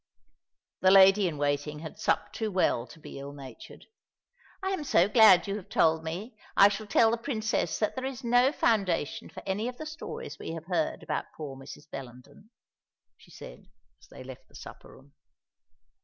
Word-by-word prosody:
The 185 - +4
lady 195 +1 +7
in 160 -4 -4
waiting 145 +1 -1
had 160 - -9
supped - - 0
too 220 -1 -2
well 180 - +1
to 165 - -15
be 145 - -10
ill 140 +1 -8
natured. 135 -4 -12 0.8
"I 380 - -1
am 375 -6 -2
so 185 -10 +3
glad 210 -4 +6
you 200 +1 -2
have 195 - -11
told 160 0 +2
me. 185 +9 -6 0.2
I 200 - +8
shall 205 +1 -5
tell 225 +2 +4
the 235 - 0
Princess 220 -4 -2
that 215 - -1
there 260 0 -4
is 265 -2 -6
no 245 +3 +4
foundation 195 - 0
for - - -11
any 200 +4 -2
of 250 0 -6
the 310 - -7
stories 310 +2 -8
we - - -6
have 165 -1 -7
heard 170 -3 -2
about - - -3
poor 145 -4 -6
Mrs. 135 +2 -12
Bellenden," 130 - -11 0.7
she - - -21
said, - - -12 0.3
as - - -19
they - - -12
left - - -11
the - - -21
supper - - -12
room. 140 +1 -18
190 Hz, 185 wpm, -28 LUFS, 150-225 Hz, 0.8 s, I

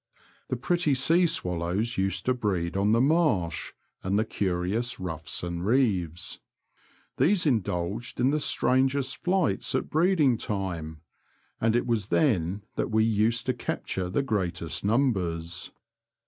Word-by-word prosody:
The - - 0
pretty 155 +3 +1
sea 165 +7 +3
swallows 90 - -1
used 95 0 -1
to 130 - +3
breed 95 -8 -2
on 100 +2 +2
the 115 - +4
marsh, 130 - +1 0.3
and 95 +2 0
the 110 - +2
curious 100 +5 -1
ruffs 85 -2 -4
and 85 0 -3
reeves. 95 - 0 0.8
These 190 0 +3
indulged 105 - -1
in 130 +2 +3
the 150 - +1
strangest 135 -1 +1
flights 180 - 0
at 130 - -2
breeding 155 - +3
time, 85 -7 -4 0.6
and 115 0 +2
it 120 - +1
was 115 -5 0
then 100 - +1
that - - 0
we 110 0 +3
used 110 +1 +1
to 130 - +1
capture 95 -6 -3
the 140 +10 0
greatest 90 -8 -2
numbers. 90 -8 0
110 Hz, 135 wpm, -27 LUFS, 90-130 Hz, 0.8 s, the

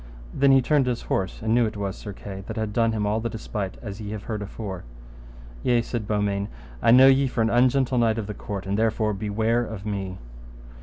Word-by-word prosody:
Then 140 0 +4
he 135 -1 +5
turned 145 -1 +3
his 120 -1 -1
horse, 95 +2 -2
and 110 0 +1
knew 120 -1 +4
it 110 0 -6
was 100 -2 -3
Sir 105 - -7
Kay, 95 0 -8
that - - -5
had 110 -1 -2
done 115 0 +2
him 105 -2 -1
all 105 +2 +1
the 115 +1 -2
despite 105 -4 -5
as 105 -1 -6
ye 105 - -5
have 105 -1 -6
heard 110 -2 -4
afore. 100 -2 -6 0.8
Yea, 120 -1 +2
said 115 -3 -4
Beaumains, 100 -1 0 0.3
I - - +3
know 125 +3 +8
you 135 0 +5
for 125 - -1
an 110 - +1
ungentle 125 +1 +3
knight 115 -2 +2
of 110 - -2
the 105 - -5
court, 100 -1 -6
and 100 +2 -1
therefore 110 -1 +1
beware 110 +4 0
of 110 -3 -7
me. 95 -3 -3
110 Hz, 225 wpm, -25 LUFS, 100-120 Hz, 0.8 s, know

